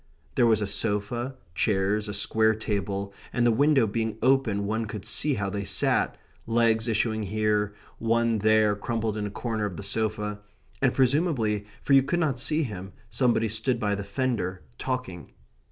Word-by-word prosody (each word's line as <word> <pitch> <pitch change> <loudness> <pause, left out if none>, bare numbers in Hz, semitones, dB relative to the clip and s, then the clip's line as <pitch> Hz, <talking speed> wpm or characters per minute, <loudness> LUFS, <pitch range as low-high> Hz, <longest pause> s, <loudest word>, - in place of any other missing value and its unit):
There 120 - +4
was 110 -2 +3
a - - +1
sofa, 105 +5 -1 0.2
chairs, 105 +2 +1
a 105 - -4
square 110 +2 +2
table, 100 -2 -3 0.2
and 120 - +1
the 120 - +5
window 140 +1 +4
being 110 0 -2
open, 125 -6 +2
one 110 +2 -1
could 105 -1 -7
see 150 -3 +1
how 100 -2 -2
they 100 0 -3
sat - - +1 0.3
legs 115 -1 +2
issuing 110 -1 +1
here, 105 0 0 0.2
one 115 0 +2
there 110 0 +4
crumpled 110 0 -2
in 105 -1 -2
a - - -5
corner 110 +1 -2
of 95 -4 -5
the 100 - -6
sofa; 105 -1 -1 0.4
and, 135 -2 +4
presumably, 130 - +1 0.2
for 140 - +2
you 135 - +8
could 170 +6 -1
not 145 -7 0
see 155 +5 +1
him, 95 -6 -6 0.2
somebody 115 -1 +2
stood 115 +3 -1
by 105 -3 0
the 100 0 -3
fender, 100 - -2 0.2
talking. 125 -10 -4
110 Hz, 170 wpm, -27 LUFS, 105-120 Hz, 0.4 s, you